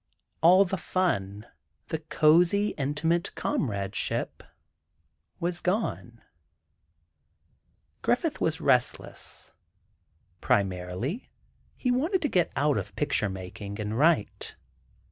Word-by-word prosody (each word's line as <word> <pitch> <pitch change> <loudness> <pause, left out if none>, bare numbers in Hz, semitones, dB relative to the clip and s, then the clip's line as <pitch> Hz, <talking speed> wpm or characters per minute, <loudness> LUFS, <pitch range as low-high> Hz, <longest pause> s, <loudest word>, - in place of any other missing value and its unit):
All 185 +4 +7
the 190 0 -3
fun, 105 - -1 0.4
the 160 - -2
cozy, 170 +6 +4
intimate 155 +4 -1
comradeship, 100 -6 -1 1.0
was 175 0 -1
gone. 180 - -2 1.8
Griffith - - 0
was - - 0
restless. - - 0 0.9
Primarily, 95 - -1 0.5
he 250 - 0
wanted 320 +10 +1
to 295 - +1
get 180 -6 +1
out 145 +2 +2
of - - -8
picture 140 -8 +1
making, 95 +2 -7
and 105 +1 -3
write. 145 - +1
150 Hz, 90 wpm, -27 LUFS, -, 1.8 s, All